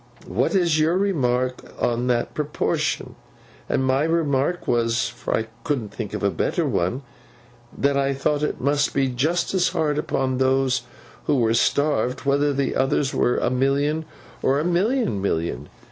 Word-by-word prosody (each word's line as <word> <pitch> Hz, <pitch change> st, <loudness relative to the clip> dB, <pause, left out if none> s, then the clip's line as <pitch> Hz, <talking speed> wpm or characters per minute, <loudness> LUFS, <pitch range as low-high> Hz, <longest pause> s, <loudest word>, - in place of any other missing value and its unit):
What -, -, 0 dB
is 170 Hz, -4 st, +3 dB
your 160 Hz, +3 st, +3 dB
remark 130 Hz, -10 st, 0 dB, 0.2 s
on 120 Hz, +1 st, 0 dB
that 120 Hz, -1 st, 0 dB
proportion? 150 Hz, -1 st, -1 dB, 0.6 s
And 130 Hz, -, +1 dB
my 130 Hz, +1 st, +2 dB
remark 160 Hz, 0 st, 0 dB
was—for 120 Hz, 0 st, 0 dB
I 110 Hz, -, -2 dB, 0.2 s
couldn't 140 Hz, -9 st, -2 dB
think 110 Hz, -4 st, -5 dB
of -, -, -5 dB
a 100 Hz, -, +2 dB
better 80 Hz, -, 0 dB
one—that 120 Hz, +4 st, -4 dB
I 140 Hz, 0 st, +1 dB
thought 145 Hz, +2 st, 0 dB
it 150 Hz, -, -1 dB
must 145 Hz, +2 st, +1 dB
be 135 Hz, -1 st, +2 dB
just 155 Hz, +10 st, 0 dB
as 180 Hz, -2 st, +3 dB
hard 155 Hz, -4 st, 0 dB
upon 130 Hz, -3 st, -1 dB
those 130 Hz, -1 st, +2 dB, 0.4 s
who 150 Hz, -, +2 dB
were 115 Hz, -3 st, +2 dB
starved, 140 Hz, +1 st, +1 dB
whether 140 Hz, +1 st, +2 dB
the 140 Hz, -1 st, -1 dB
others 135 Hz, +1 st, +1 dB
were 125 Hz, -, +2 dB
a 120 Hz, -, 0 dB
million, 140 Hz, +4 st, +1 dB, 0.4 s
or 135 Hz, +2 st, +2 dB
a 155 Hz, -, -1 dB
million 180 Hz, -, +1 dB
million. 85 Hz, -4 st, -2 dB
135 Hz, 155 wpm, -23 LUFS, 120-150 Hz, 0.6 s, is